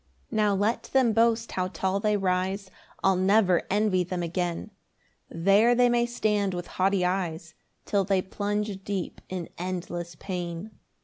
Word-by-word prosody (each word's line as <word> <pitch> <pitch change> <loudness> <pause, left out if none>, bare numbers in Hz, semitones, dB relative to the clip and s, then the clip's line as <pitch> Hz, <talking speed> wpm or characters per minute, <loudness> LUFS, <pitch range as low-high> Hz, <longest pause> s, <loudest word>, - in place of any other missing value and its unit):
3 - - -5
Now 210 -2 +3
let 210 +4 0
them 255 -4 +4
boast 230 +1 +2
how 185 -1 -1
tall 190 +2 -1
they 210 0 +1
rise, 190 +1 -1 0.3
I'll 190 0 +4
never 185 -1 +3
envy 200 -2 +2
them 180 0 -3
again; 175 +3 -2 0.6
There 200 +8 +4
they 245 0 +4
may 240 0 +2
stand 210 -5 0
with 175 0 -4
haughty 190 0 +1
eyes, 170 -3 -2 0.3
Till 200 -2 +1
they 190 -1 +1
plunge 205 0 -3
deep 195 -3 -4
in 180 -3 -5
endless 175 -1 -4
pain. 175 +2 -5
190 Hz, 150 wpm, -27 LUFS, 180-210 Hz, 0.6 s, them